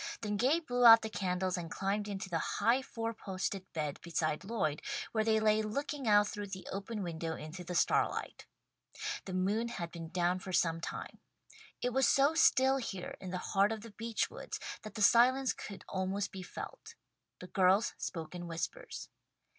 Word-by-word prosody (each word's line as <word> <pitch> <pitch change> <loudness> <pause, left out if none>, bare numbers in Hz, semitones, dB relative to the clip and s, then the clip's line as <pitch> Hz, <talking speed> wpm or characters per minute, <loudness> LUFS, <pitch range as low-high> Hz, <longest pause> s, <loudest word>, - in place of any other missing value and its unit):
Then 210 -2 -1
Gay 265 +10 +3
blew 245 -7 -1
out 230 -1 +10
the 220 - -4
candles 185 -2 -1
and 165 -1 -6
climbed 200 +4 -1
into 195 -2 -4
the 170 -3 -1 0.2
high 245 +3 +3
four 230 -3 -4
posted 190 -2 -4
bed 150 -3 -3
beside 155 -2 -1
Lloyd, 185 -9 -1 0.3
where 220 -1 +1
they 220 0 +3
lay 215 0 +3
looking 275 +5 -3
out 205 -1 +6
through 205 0 -5
the 190 -1 -7
open 200 +2 -4
window 165 -1 -3
into 160 +4 -8
the 180 +1 -5
starlight. - - +1 0.8
The 185 - -4
moon 205 +5 +1
had 175 -8 -5
been 165 -2 -7
down 180 +1 +1
for 185 0 -7
some 165 -1 +2
time. - - -6 0.6
It 245 0 0
was 265 +1 +4
so 280 +3 +4
still 265 -4 +5
here 195 -8 -5
in 185 - -7
the 180 - -2 0.2
heart 200 +1 +4
of 220 -1 -3
the 230 0 -10
beech 230 +1 -1
woods - - -7 0.2
that 215 -2 -9
the 215 - 0
silence 255 +4 +5
could 200 - -9
almost 190 +1 -2
be 190 - -7
felt. 180 - -8 0.4
The - - -8
girls 190 +3 +3
spoke 165 -2 -5
in 175 -1 -6
whispers. 315 - -5
200 Hz, 185 wpm, -33 LUFS, 180-230 Hz, 0.8 s, out